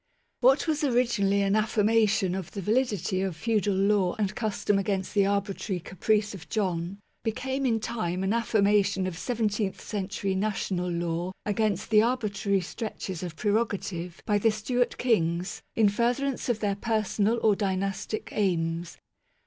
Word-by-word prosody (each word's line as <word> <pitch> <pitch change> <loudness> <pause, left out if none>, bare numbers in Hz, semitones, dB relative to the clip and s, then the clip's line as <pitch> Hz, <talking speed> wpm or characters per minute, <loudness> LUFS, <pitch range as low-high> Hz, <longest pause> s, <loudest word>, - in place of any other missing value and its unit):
What 265 +6 +4
was 305 -1 0
originally 235 -7 +2
an 195 +1 +2
affirmation 215 -3 +2
of 190 -2 -4
the 200 - -6
validity 210 -5 +1
of 190 -3 -2
feudal 210 +2 0
law 195 -2 +2
and 205 -2 0
custom 210 -2 0
against 195 -1 -2
the 200 -1 +3
arbitrary 200 -1 -1
caprice 210 +4 0
of 180 -4 -10
John, 185 -3 -1 0.3
became 265 +4 -1
in 225 -2 +2
time 190 -5 -2
an 195 +2 +1
affirmation 200 -4 +2
of 185 -2 -3
seventeenth 210 -1 -1
century 195 -1 -3
national 190 -2 -1
law 170 +1 -2
against 210 -1 0
the 215 -1 +7
arbitrary 215 -4 0
stretches 190 -2 -5
of 175 -3 -5
prerogative 200 -4 -2
by 205 -1 +2
the 225 - +4
Stewart 240 +3 0
Kings 180 -6 0
in 220 -2 +5
furtherance 245 +6 0
of 230 -2 0
their 205 -2 +1
personal 220 0 +1
or 215 -2 +5
dynastic 195 +2 -2
aims. 170 -4 -1
205 Hz, 145 wpm, -27 LUFS, 190-220 Hz, 0.3 s, the